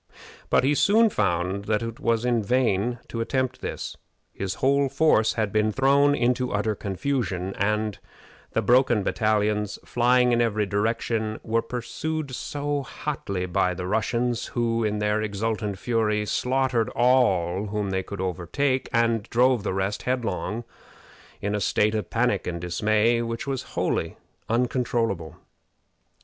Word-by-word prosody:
But - - +4
he 140 +3 +3
soon 215 +8 +4
found 95 - 0
that 105 +1 0
it 115 0 -6
was 115 0 +1
in 120 -2 +2
vain 120 0 +1
to 115 - -4
attempt 130 +2 -1
this. - - -5 0.4
His 95 0 -3
whole 140 +1 +2
force 120 -8 +3
had 110 -3 -1
been 110 +1 +2
thrown 140 +4 +4
into 125 0 +1
utter 105 +1 0
confusion; 100 -3 -2
and 105 +1 -1 0.5
the - - +1
broken 120 -4 +4
battalions, 105 -1 0
flying 125 +1 +3
in 120 0 +3
every 110 -2 +1
direction, 110 +1 -1
were 115 0 +1
pursued 140 +5 -4
so 145 +2 -2
hotly 110 -10 -4
by 90 0 0
the 90 0 -5
Russians, 115 +4 0
who, 115 -1 +1
in 105 -1 0
their 105 +1 +1
exultant 105 -1 -2
fury, 105 -1 0
slaughtered 125 -1 0
all 105 -7 +2
whom 105 -1 -2
they 95 0 0
could 100 +1 -8
overtake, 95 - -1
and 115 -2 +1
drove 125 0 +3
the - - -2
rest 95 +2 -1
headlong 115 -6 -2
on 120 - -5 0.8
in 105 +1 -1
a 105 - -1
state 105 +3 +2
of 110 -1 -2
panic 115 -4 0
and 85 -1 -3
dismay 110 +6 +1
which 115 0 -4
was 135 -2 -2 0.2
wholly - - -1 0.3
uncontrollable. 115 - 0
115 Hz, 145 wpm, -25 LUFS, 105-125 Hz, 0.8 s, But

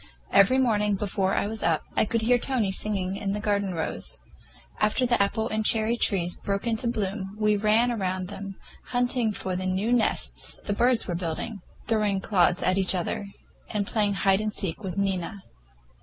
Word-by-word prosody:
Every 200 +7 +6
morning, 210 -5 +2
before 195 -1 -1
I - - +1
was 220 +1 -3
up, 160 -2 +1
I - - +3
could 225 +1 -1
hear 245 +2 +4
Tony 235 -7 +1
singing 195 -2 -1
in 200 -1 -2
the 210 - -2
garden 200 -3 0
rows. 160 - -2 0.6
After 215 +4 +2
the 240 -3 +2
apple 220 +3 0
and 220 0 -1
cherry 220 +1 +2
trees 180 -6 +1
broke 200 +2 -3
into 230 0 0
bloom, 200 -3 -3
we 210 -1 +3
ran 215 +4 +3
about 200 -6 -1
under 185 -1 -5
them, 195 0 -7 0.3
hunting 245 -2 0
for 190 -2 -3
the 185 +1 -2
new 195 +6 0
nests 235 -3 0
the 205 - 0
birds 240 +2 +2
were 175 - -2
building, 175 +5 -4 0.2
throwing 210 -3 +1
clods 180 -3 +2
at 185 +1 +2
each 190 0 +4
other, 185 +3 -2 0.4
and 205 -2 -1
playing 205 -1 +1
hide 195 +2 +2
and 215 0 -1
seek 190 -1 -3
with 185 -2 -5
Nina. 195 0 -2
205 Hz, 185 wpm, -26 LUFS, 190-220 Hz, 0.6 s, Every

